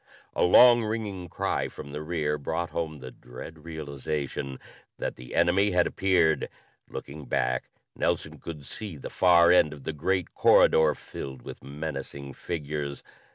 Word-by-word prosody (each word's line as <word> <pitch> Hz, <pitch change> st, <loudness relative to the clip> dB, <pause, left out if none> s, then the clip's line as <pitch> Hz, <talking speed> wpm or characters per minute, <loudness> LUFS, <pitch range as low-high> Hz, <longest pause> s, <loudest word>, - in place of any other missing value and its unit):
A -, -, 0 dB
long 120 Hz, +6 st, +8 dB
ringing 105 Hz, -5 st, -3 dB
cry -, -, -1 dB
from 70 Hz, -, -9 dB
the 75 Hz, +1 st, -5 dB
rear 75 Hz, -2 st, -1 dB
brought 80 Hz, +4 st, -2 dB
home 80 Hz, -2 st, -3 dB
the 65 Hz, 0 st, -8 dB
dread 75 Hz, +6 st, -11 dB
realization 70 Hz, -3 st, -4 dB, 0.4 s
that -, -, -3 dB
the 60 Hz, 0 st, -9 dB
enemy 100 Hz, +3 st, +3 dB
had 90 Hz, -1 st, +4 dB
appeared. 85 Hz, -6 st, +2 dB, 0.4 s
Looking 70 Hz, +1 st, -8 dB
back, 65 Hz, 0 st, -1 dB, 0.3 s
Nelson -, -, -1 dB
could 75 Hz, -4 st, -8 dB
see 100 Hz, -2 st, -6 dB
the 70 Hz, -, -8 dB
far 85 Hz, -2 st, +6 dB
end 75 Hz, -4 st, +5 dB
of 70 Hz, -3 st, -12 dB
the 80 Hz, -, -3 dB
great 90 Hz, +4 st, -1 dB
corridor 80 Hz, -1 st, +5 dB
filled 65 Hz, -3 st, -8 dB
with -, -, -9 dB
menacing 70 Hz, -1 st, -6 dB
figures. 75 Hz, -3 st, -4 dB
80 Hz, 150 wpm, -27 LUFS, 70-90 Hz, 0.4 s, long